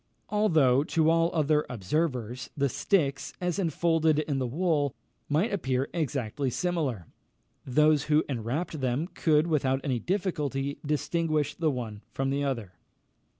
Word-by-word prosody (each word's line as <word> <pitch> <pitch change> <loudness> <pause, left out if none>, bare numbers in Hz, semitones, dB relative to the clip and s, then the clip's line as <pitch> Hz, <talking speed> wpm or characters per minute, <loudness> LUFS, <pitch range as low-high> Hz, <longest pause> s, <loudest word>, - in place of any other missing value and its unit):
Although, 155 -11 +3
to 160 0 +2
all 165 0 +3
other 150 -1 +2
observers, 125 - -2
the 140 -1 +2
sticks, 140 - 0
as 180 0 -1
enfolded 165 -3 +2
in 150 -3 0
the 130 - -1
wool, 150 0 0 0.3
might 165 +10 +1
appear 130 -8 0
exactly 140 -4 -1
similar, 145 - -1 0.6
those 150 +2 +3
who 155 +1 +3
enwrapped 140 +6 -3
them 130 +4 0
could, 155 -1 +3
without 135 -5 +1
any 130 -5 0
difficulty, 145 - -2
distinguish 150 0 0
the 165 -2 0
one 115 -6 -4
from 135 0 -1
the 140 +1 0
other. 120 -9 -2
150 Hz, 135 wpm, -28 LUFS, 130-165 Hz, 0.6 s, Although